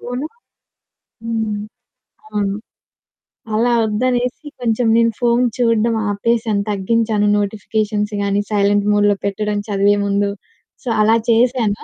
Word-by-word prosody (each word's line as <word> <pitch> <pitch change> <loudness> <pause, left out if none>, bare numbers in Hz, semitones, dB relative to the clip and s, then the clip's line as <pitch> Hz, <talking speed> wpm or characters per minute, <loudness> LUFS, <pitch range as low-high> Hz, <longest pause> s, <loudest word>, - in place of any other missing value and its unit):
Phone 250 +4 -4 1.0
హ్మ్. 220 -2 -2 0.7
అవును. 200 - -1 1.0
అలా 235 +3 +2
వద్దనేసి 245 +6 -1
కొంచెం 235 0 +1
నేను 230 0 +3
ఫోను 240 +1 +2
చూడడం 230 -1 +2 0.2
ఆపేశాను, 220 0 0
తగ్గించాను 210 +1 +1
నోటిఫికేషన్స్ 210 +1 -2
గాని, 200 0 0
సైలెంట్ 205 0 +2
మోడ్‌లో 205 0 +3
పెట్టడం 210 +1 -1
చదివే 205 0 +2
ముందు. 200 0 +1 0.5
సో, - - -11
అలా 220 +1 +4
చేశాను. 230 -2 +2
215 Hz, 105 wpm, -18 LUFS, 205-235 Hz, 1.0 s, అలా